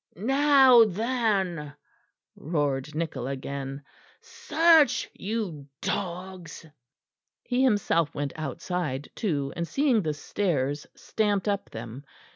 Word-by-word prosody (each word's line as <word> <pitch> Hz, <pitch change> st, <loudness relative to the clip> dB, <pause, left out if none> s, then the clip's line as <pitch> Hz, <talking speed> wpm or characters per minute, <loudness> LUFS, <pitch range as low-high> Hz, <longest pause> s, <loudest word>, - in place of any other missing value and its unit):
"Now 265 Hz, -, +6 dB
then," 200 Hz, -, -1 dB, 0.6 s
roared 145 Hz, -2 st, -2 dB
Nichol 155 Hz, -6 st, -3 dB
again, 135 Hz, +1 st, -5 dB, 0.4 s
"search, 320 Hz, -1 st, +3 dB
you 190 Hz, -9 st, -4 dB
dogs!" 180 Hz, -2 st, -5 dB, 0.8 s
He 250 Hz, 0 st, 0 dB
himself 200 Hz, -, +2 dB
went 145 Hz, -1 st, -3 dB
outside 155 Hz, -1 st, -4 dB
too, 145 Hz, -, -2 dB
and 170 Hz, 0 st, -3 dB
seeing 270 Hz, -, +2 dB
the 155 Hz, -4 st, -2 dB
stairs 145 Hz, -4 st, -2 dB
stamped 205 Hz, -2 st, -1 dB
up 200 Hz, -1 st, -1 dB
them. 115 Hz, +4 st, -8 dB
175 Hz, 95 wpm, -27 LUFS, 145-220 Hz, 0.8 s, Now